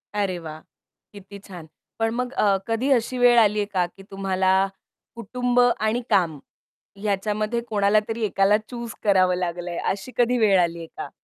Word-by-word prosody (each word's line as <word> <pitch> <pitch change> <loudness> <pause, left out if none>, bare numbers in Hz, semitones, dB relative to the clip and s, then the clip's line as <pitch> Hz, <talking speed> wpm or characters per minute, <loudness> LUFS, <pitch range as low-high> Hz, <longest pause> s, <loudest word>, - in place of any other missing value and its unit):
अरे 195 -3 -1
वाह! 155 -1 -8 0.5
किती 200 0 -12
छान. 180 -5 -11 0.3
पण 225 0 +1
मग 250 +1 -3
अ, 200 -5 +2
कधी 230 +5 -1
अशी 250 0 +1
वेळ 245 -1 +5
आलीये 210 -1 +3
का 185 -3 0
की 195 +2 -17
तुम्हाला 190 -1 0 0.6
कुटुंब 245 +2 -1
आणि 240 -1 +2
काम 165 -6 +1 0.6
ह्याच्यामध्ये 210 +3 -1
कोणाला 205 0 +3
तरी 225 0 -3
एकाला 200 0 +3
चूज 235 -2 -6
करावं 185 -3 +3
लागलंय 175 -1 -4
अशी 200 +6 -6
कधी 245 0 +2
वेळ 200 -5 +4
आलीये 170 -1 -2
का? - - -6
205 Hz, 155 wpm, -23 LUFS, 185-235 Hz, 0.6 s, वेळ